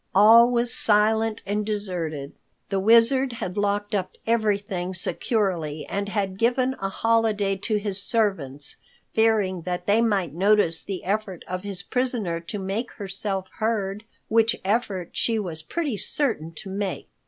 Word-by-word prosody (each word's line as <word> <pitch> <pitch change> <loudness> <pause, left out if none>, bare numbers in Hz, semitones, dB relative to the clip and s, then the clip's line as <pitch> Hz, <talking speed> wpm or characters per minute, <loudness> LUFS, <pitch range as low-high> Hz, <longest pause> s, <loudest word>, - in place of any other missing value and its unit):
All 225 +4 +8
was 240 0 0
silent 220 +1 +2
and 210 +1 -1
deserted. 180 -9 -3 0.4
The 195 -1 0
Wizard 235 +5 +5
had 220 -6 -5
locked 205 0 -1
up 190 -3 -2
everything 200 -5 0
securely 175 -6 -1
and 200 0 -3
had 195 -2 -2
given 250 +2 +2
a 195 - -1
holiday 215 -2 +1
to 210 +3 -2
his 205 -1 -2
servants, 190 - -1 0.4
fearing 215 -5 +2
that 180 +1 -4
they 210 +4 +3
might 200 -9 +1
notice 190 -2 +3
the 195 -2 -5
effort 200 -2 -3
of 185 0 -4
his 195 -2 -4
prisoner 240 -10 -1
to 170 +5 -6
make 200 +5 -3
herself 195 -1 -3
heard, 210 -2 -1 0.2
which 225 +1 +3
effort 200 -4 -1
she 230 -1 0
was 175 -7 0
pretty 285 - -3
certain 215 - -2
to 190 +5 -9
make. 195 -1 -3
205 Hz, 145 wpm, -24 LUFS, 185-225 Hz, 0.4 s, All